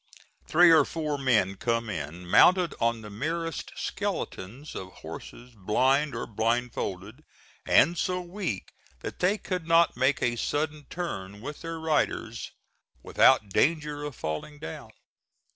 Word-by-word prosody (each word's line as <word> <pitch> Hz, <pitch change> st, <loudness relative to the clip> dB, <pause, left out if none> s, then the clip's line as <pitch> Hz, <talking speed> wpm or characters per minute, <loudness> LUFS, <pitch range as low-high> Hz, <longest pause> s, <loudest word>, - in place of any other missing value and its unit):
Three 175 Hz, +1 st, +6 dB
or 160 Hz, -2 st, +7 dB
four 150 Hz, -1 st, -3 dB
men 110 Hz, -8 st, +2 dB
come 115 Hz, +1 st, 0 dB
in, 85 Hz, -2 st, -5 dB
mounted 180 Hz, -, +5 dB
on 115 Hz, 0 st, +1 dB
the 105 Hz, -1 st, -9 dB
merest 165 Hz, +8 st, -3 dB
skeletons 120 Hz, +11 st, -4 dB
of 95 Hz, 0 st, -7 dB
horses 125 Hz, +1 st, -9 dB
blind 130 Hz, +8 st, +1 dB
or -, -, -3 dB
blind 115 Hz, +3 st, 0 dB
folded 100 Hz, +9 st, -5 dB, 0.4 s
and 170 Hz, +3 st, +5 dB
so 180 Hz, +1 st, -1 dB
weak 180 Hz, -, -4 dB, 0.3 s
that -, -, -6 dB
they 190 Hz, +4 st, +2 dB
could 180 Hz, -5 st, -4 dB
not 165 Hz, 0 st, +4 dB
make 135 Hz, +4 st, +1 dB
a 120 Hz, -1 st, +1 dB
sudden 150 Hz, +4 st, -2 dB
turn 100 Hz, -, -5 dB
with 145 Hz, +6 st, -7 dB
their 165 Hz, 0 st, -5 dB
riders 150 Hz, -7 st, -1 dB, 0.5 s
without 105 Hz, -, +4 dB
danger 150 Hz, -, +1 dB
of 145 Hz, -3 st, -5 dB
falling 80 Hz, -, -5 dB
down. 80 Hz, -, -8 dB
135 Hz, 140 wpm, -27 LUFS, 110-160 Hz, 0.5 s, or